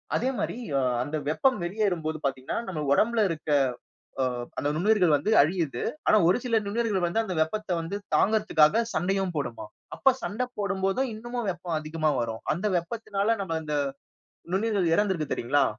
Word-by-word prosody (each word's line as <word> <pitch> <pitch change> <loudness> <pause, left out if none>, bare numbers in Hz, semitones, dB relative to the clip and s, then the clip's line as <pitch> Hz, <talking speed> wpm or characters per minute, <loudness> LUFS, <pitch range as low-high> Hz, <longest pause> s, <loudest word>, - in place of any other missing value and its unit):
அதே 255 +3 +1
மாதிரி, - - -2 0.2
அ - - +3 0.2
அந்த 145 +4 -4
வெப்பம் 260 - +2
வெளியேறும் 185 -2 -1
போது 155 0 -1
பாத்தீங்கன்னா, 130 -1 -2
நம்ப 165 -5 -3
உடம்பில 225 +8 +3
இருக்க 160 -2 -5 0.7
அ - - +3 0.3
அந்த 145 - 0
நுண்ணுயிர்கள் 180 -2 +3
வந்து 145 +9 -1
அழியுது. 155 -5 -1 0.3
ஆனா, - - +6
ஒரு 180 - +4
சில 235 -2 +1
நுண்ணுயிர்கள் 205 -3 0
வந்து 200 +7 0
அந்த 190 -4 -4
வெப்பத்தை 200 +5 -1
வந்து 165 +5 -4 0.2
தாங்குறதுக்காக 215 -2 +4
சண்டையும் 190 +2 0
போடுமாம். 120 -6 -4 0.3
அப்ப, 270 - +4
சண்டை 210 +8 -2
போடும் 200 -2 -2
போதும், 225 +8 +1
இன்னமும் 240 0 -4
வெப்பம் 175 -2 -4
அதிகமா 155 0 -1
வரும். 115 -1 -3
அந்த 180 +6 -3
வெப்பத்தினால 205 +3 -1
நாம 165 -4 -2
இந்த 150 -1 -3 0.8
நுண்ணுயிர்கள் 195 -3 +1
இறந்து 205 0 +2
இருக்கு 155 -4 -3
தெரிங்களா? 140 +4 +2
185 Hz, 165 wpm, -27 LUFS, 155-215 Hz, 0.8 s, ஆனா